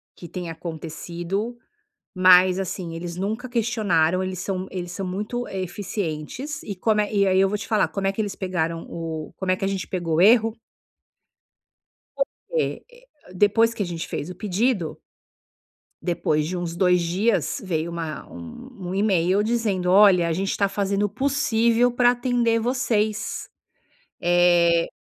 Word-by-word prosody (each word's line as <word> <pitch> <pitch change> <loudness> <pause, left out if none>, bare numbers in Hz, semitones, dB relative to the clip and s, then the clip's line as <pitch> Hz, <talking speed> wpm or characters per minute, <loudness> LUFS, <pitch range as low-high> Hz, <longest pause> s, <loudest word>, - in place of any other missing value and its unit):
que 175 - -10
tenha 175 0 -5
acontecido, 170 +6 -5 0.6
mas 185 0 +6
assim, 180 -2 -4
eles 170 +1 -5
nunca 220 +6 -3
questionaram, 200 -7 +1
eles 185 -1 -4
são 185 0 -3
eles 175 -2 -5
são 195 +2 -4
muito 210 +6 -3
eficientes 190 - -4
e 200 - -5
como 210 +3 +2
eh, 210 +1 -3
e 200 -1 +3
aí 190 0 +3
eu 195 0 +4
vou 210 - -1
te 205 - -7
falar, 215 -2 +2
como 195 -1 -2
é - - +2
que 220 - -1
eles 205 -2 -3
pegaram 170 -3 -2
o 160 -2 -5
como 190 -1 -1
é - - +3
que 195 - -3
a - - +1
gente 195 -1 -3
pegou 175 -3 -2
o 165 - +3
erro? 225 +2 +5 1.6
Porque - - -2 0.5
depois 225 +4 +3
que 220 - -2
a - - -2
gente 170 -1 -5
fez 155 - -4
o - - -6
pedido 205 -3 -1 1.0
depois 160 -3 0
de 180 +3 -3
uns 175 -1 -3
2 180 0 +3
dias, 185 - 0
veio 170 -3 -2
uma 165 -2 -5
um 185 - -9
um 185 - -3
e-mail 195 -1 +2
dizendo 210 -5 0
olha 185 -3 +6
a - - 0
gente 190 +4 -1
tá 200 - +2
fazendo 200 0 -1
o - - +1
possível 245 -2 +2
pra 245 0 +4
atender 245 -2 +1
vocês. 220 -3 -1 0.7
Eh, 175 -1 +4
190 Hz, 160 wpm, -24 LUFS, 175-220 Hz, 1.6 s, mas